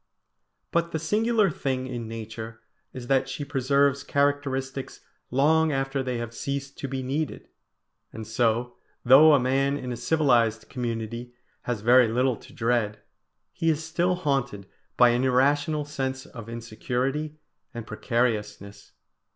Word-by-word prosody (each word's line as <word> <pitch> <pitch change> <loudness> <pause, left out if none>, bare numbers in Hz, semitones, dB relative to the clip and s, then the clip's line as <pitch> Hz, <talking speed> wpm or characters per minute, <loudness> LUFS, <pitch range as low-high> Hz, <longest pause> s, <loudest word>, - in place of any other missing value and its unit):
But 170 0 0
the - - +1
singular 210 +4 +2
thing 130 -3 -2
in 120 -3 -5
Nature 110 0 -7 0.3
is 125 -2 -8
that 135 +1 +1
she 145 - -4
preserves 140 0 +2
characteristics 140 -2 -1 0.3
long 155 +4 +3
after 135 0 -1
they 125 -2 -2
have 115 0 -5
ceased 140 +3 -4
to 140 - -3
be 135 0 -4
needed; 145 +4 -3 0.6
and 110 0 -7
so, 115 +2 0 0.3
though 145 +5 +8
a - - +4
man 135 +2 +1
in 125 -3 -5
a - - -3
civilised 120 -5 +2
community 120 -1 -4 0.3
has 120 -4 -1
very 125 +2 +6
little 125 +2 +1
to 130 - -16
dread, 115 -5 -1 0.5
he 165 - 0
is 160 0 0
still 175 +3 0
haunted 135 - -2 0.3
by 125 -1 +7
an 120 +2 +1
irrational 145 +4 +2
sense 130 -2 -4
of 115 -2 -10
insecurity 125 +6 -3 0.3
and 120 -3 -7
precariousness. 110 -3 -2
130 Hz, 140 wpm, -26 LUFS, 120-145 Hz, 0.6 s, though